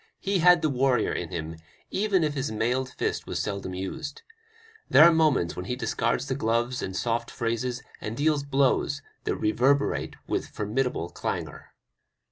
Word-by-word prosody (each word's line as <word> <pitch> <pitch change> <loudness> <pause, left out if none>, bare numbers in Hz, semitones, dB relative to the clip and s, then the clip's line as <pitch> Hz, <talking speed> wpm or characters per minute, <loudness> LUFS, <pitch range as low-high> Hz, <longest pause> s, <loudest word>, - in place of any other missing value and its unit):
He 195 -1 0
had 175 0 +6
the 155 - +3
warrior 130 -3 +2
in - - -3
him, 80 +1 -5 0.3
even 195 -3 +2
if 150 -1 0
his 135 -3 -2
mailed 120 +4 0
fist - - -3
was - - -3
seldom 100 -3 -3
used. 140 - -5 0.7
There - - +8
are 170 +1 +8
moments 155 - +2
when 90 - -5
he 125 - -2
discards - - -1
gloves 120 +3 0
and 95 0 -4
soft 115 +1 -1
phrases 120 +2 -2 0.2
and 110 +2 -5
deals 150 0 +2
blows 140 -1 +1 0.2
that - - 0
reverberate 135 +6 +1
with - - -2
formidable 105 -4 -2
clangor. - - -5
125 Hz, 155 wpm, -27 LUFS, 110-145 Hz, 0.7 s, There